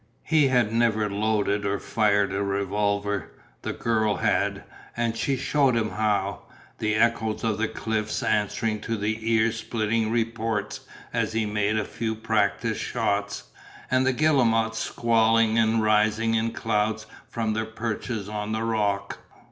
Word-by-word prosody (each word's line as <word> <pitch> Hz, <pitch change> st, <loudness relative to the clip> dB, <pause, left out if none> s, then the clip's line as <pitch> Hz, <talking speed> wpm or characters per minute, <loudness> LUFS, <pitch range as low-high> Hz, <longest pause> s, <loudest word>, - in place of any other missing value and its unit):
He 155 Hz, -2 st, +3 dB
had 120 Hz, -4 st, +2 dB
never 115 Hz, -2 st, +2 dB
loaded 105 Hz, 0 st, 0 dB
or 100 Hz, 0 st, 0 dB
fired 105 Hz, -3 st, +1 dB
a 100 Hz, -, -1 dB
revolver; 100 Hz, +1 st, -1 dB, 0.3 s
the -, -, -3 dB
girl 110 Hz, -2 st, 0 dB
had, -, -, 0 dB, 0.3 s
and 115 Hz, -1 st, 0 dB
she 135 Hz, +3 st, 0 dB
shewed 135 Hz, -2 st, +2 dB
him 110 Hz, -2 st, 0 dB
how, 100 Hz, -2 st, 0 dB, 0.4 s
the 110 Hz, 0 st, 0 dB
echoes 110 Hz, -1 st, +1 dB
of 110 Hz, -2 st, 0 dB
the 115 Hz, -, +1 dB
cliffs 110 Hz, 0 st, -2 dB
answering 105 Hz, +1 st, 0 dB
to 115 Hz, +1 st, -2 dB
the 110 Hz, +2 st, -2 dB
ear 115 Hz, 0 st, +3 dB
splitting 110 Hz, -1 st, -1 dB
reports 115 Hz, -2 st, -1 dB, 0.3 s
as -, -, 0 dB
he 110 Hz, -1 st, 0 dB
made 105 Hz, 0 st, 0 dB
a 105 Hz, -, 0 dB
few 110 Hz, -1 st, -3 dB
practice 110 Hz, -2 st, 0 dB
shots, 100 Hz, 0 st, -1 dB, 0.5 s
and 130 Hz, 0 st, +3 dB
the 130 Hz, -, +3 dB
guillemots 115 Hz, -6 st, +2 dB
squalling 115 Hz, -1 st, +2 dB
and 110 Hz, 0 st, +2 dB
rising 110 Hz, +1 st, +2 dB
in 115 Hz, 0 st, +1 dB
clouds 110 Hz, 0 st, -1 dB, 0.2 s
from 110 Hz, -2 st, -1 dB
their 110 Hz, +1 st, -1 dB
perches 110 Hz, -1 st, -4 dB
on 105 Hz, 0 st, -4 dB
the 110 Hz, +1 st, -1 dB
rock. 105 Hz, -3 st, -1 dB
110 Hz, 150 wpm, -25 LUFS, 105-115 Hz, 0.5 s, He